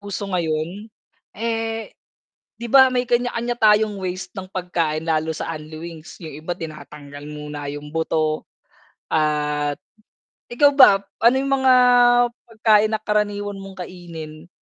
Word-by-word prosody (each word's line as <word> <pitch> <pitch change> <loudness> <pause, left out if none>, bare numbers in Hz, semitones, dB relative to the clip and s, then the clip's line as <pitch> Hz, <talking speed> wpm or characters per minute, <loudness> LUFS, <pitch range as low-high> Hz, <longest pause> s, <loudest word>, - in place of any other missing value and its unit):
Uso 205 0 -5
ngayon? 170 +4 -2 0.5
Eh, 225 0 -3 0.7
'di 235 - -5
ba 265 +2 +6
may 250 0 0
kanya-kanya 240 0 0
tayong 215 -2 +3
ways 185 0 -4
ng 185 -2 -8
pagkain 170 -4 -2
lalo 160 0 0
sa 160 +1 -4
unli 155 0 -9
wings, 165 -1 -10
yung 160 -4 -9
iba 170 - -7
tinatanggal 150 -4 -8
muna 150 -1 -6
yung 145 +1 -9
buto 155 -1 0 0.7
at 150 -1 0 0.7
ikaw 285 +4 +4
ba, 260 -8 +8 0.2
ano 235 +2 +5
yung 275 +1 -1
mga 260 -1 +5 0.8
pagkain 220 -1 +3
na - - -12
karaniwan 205 -2 -1
mong 190 -2 -8
kainin, 165 -3 -10
180 Hz, 130 wpm, -21 LUFS, 155-220 Hz, 0.8 s, ba